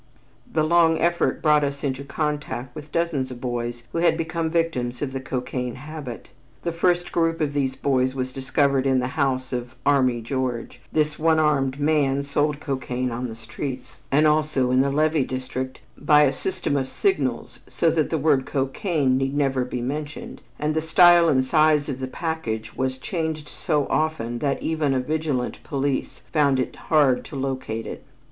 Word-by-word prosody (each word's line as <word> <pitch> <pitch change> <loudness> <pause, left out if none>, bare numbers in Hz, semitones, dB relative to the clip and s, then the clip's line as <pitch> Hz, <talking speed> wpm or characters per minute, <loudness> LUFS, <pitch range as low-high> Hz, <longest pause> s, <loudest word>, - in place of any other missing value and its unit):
The 155 - +2
long 165 0 +4
effort 170 +1 +1
brought 150 -1 +5
us 140 0 -3
into 135 -1 -2
contact 145 -4 -3
with 150 0 -9
dozens 165 -6 0
of 125 -1 -8
boys 120 -1 -3
who 170 - -1
had 170 -1 +3
become 165 0 -2
victims 160 -8 -1
of 135 -2 -3
the 135 - -2
cocaine 125 -1 -3
habit. 140 -2 -8 0.3
The 170 - -1
first 175 +1 +1
group 165 -1 +1
of 150 -2 0
these 135 -2 0
boys 130 -1 +1
was 130 -1 -2
discovered 135 0 +1
in 135 -1 +3
the 125 0 0
house 130 -3 0
of 125 0 -4
"Army 130 -4 +3
George." 120 -1 -3
This 150 -1 0
one 160 0 +3
armed 140 -3 +2
man 145 -2 +2
sold 145 +1 0
cocaine 130 -3 -2
on 120 +2 -3
the 110 - -7
streets 120 +2 -7
and 150 +3 +4
also 150 -4 +2
in 130 +1 +4
the 140 - +2
levee 155 +1 +2
district 130 0 -5
by 150 +1 +5
a 140 - +3
system 185 -6 -2
of 135 -2 -1
signals 390 - -1
so 165 - +2
that 155 -2 +1
the 160 - 0
word 140 -3 +2
cocaine 135 0 0
need 135 +1 -1
never 135 -3 +1
be 125 0 -4
mentioned, 145 +4 -5 0.2
and 150 +1 -1
the 160 - 0
style 170 +1 +6
and 130 -3 +3
size 155 +1 +3
of 135 -2 -3
the 130 - -3
package 130 -8 -4
was 130 0 -1
changed 160 +1 -3
so 150 -4 -1
often 120 -7 -1
that 140 0 -1
even 155 -4 0
a - - +2
vigilant 145 -2 -2
police 140 -1 -2
found 140 -4 +3
it 130 - -2
hard 145 -5 +2
to - - -10
locate 130 -4 -3
it. - - -7
140 Hz, 180 wpm, -24 LUFS, 130-155 Hz, 0.3 s, style